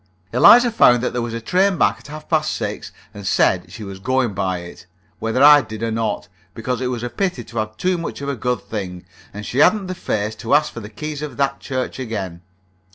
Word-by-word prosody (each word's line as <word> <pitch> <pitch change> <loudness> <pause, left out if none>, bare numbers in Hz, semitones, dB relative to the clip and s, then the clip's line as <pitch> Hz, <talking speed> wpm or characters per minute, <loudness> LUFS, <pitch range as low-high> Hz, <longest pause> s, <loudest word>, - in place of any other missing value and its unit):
Eliza 240 - +7
found 120 - +5
that - - -1
there 120 - -1
was 115 -1 -4
a - - -3
train 185 - +2
back 100 -5 +2
at 120 - -15
half 155 +1 -9
past 155 -2 +1
six, - - -4 0.2
and 100 -2 -7
said - - +2
she 110 - -8
was 100 -1 -8
going 130 0 0
by 95 -1 -1
it, 85 0 -11 0.3
whether 115 +4 +1
I 145 0 +9
did 110 -3 -7
or 115 - -1
not, 110 -2 -2 0.3
because 125 +2 -3
it 130 - 0
was 120 -2 -3
a - - -1
pity 180 -5 -2
to 115 +1 -11
have 110 0 -4
too 180 -1 0
much 165 - -5
of 140 - -5
a 140 - -1
good 125 +1 -1
thing, 90 -5 -6 0.3
and 105 +1 -8
she 130 - -2
hadn't 195 +6 +4
the 185 - -4
face 110 - -2
to 115 +5 +1
ask 150 +1 +2
for - - -6
the 105 -1 -9
keys 150 +6 -6
of 150 -1 -6
that 140 0 0
church 130 0 -4
again. 100 -8 -5
120 Hz, 235 wpm, -20 LUFS, 105-145 Hz, 0.3 s, I